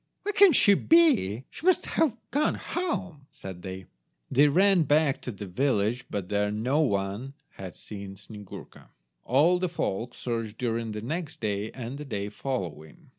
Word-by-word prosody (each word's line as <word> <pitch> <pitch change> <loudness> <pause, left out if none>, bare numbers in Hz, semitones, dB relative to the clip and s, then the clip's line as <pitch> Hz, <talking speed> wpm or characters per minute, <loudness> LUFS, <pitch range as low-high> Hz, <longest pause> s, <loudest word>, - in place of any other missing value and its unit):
"Where 415 - -1
can 400 -2 +7
she 210 -7 +6
be? 255 - +3
She - - -11
must 370 0 +3
have 270 -8 +1
gone 290 +4 +1
home," 190 - -4
said 95 -2 -9
they. 95 0 -7 0.5
They 145 +3 +5
ran 190 +4 +4
back 150 -1 +2
to 125 - -5
the 100 -1 -8
village, 120 +3 0
but 100 -3 -4
there 105 +1 0
no 120 +8 0
one 105 +1 -1
had 95 -2 -9
seen 100 -2 -9
Snyegurka. 105 0 -12 0.4
All 155 +8 +4
the 185 -1 -1
folk 120 - -3
searched 115 -3 -4
during 115 -2 -2
the 105 - -5
next 160 +4 -4
day 105 -1 -2
and 130 +2 -6
the 150 - -6
day 100 -6 -4
following. 90 - -6
120 Hz, 165 wpm, -27 LUFS, 100-160 Hz, 0.5 s, can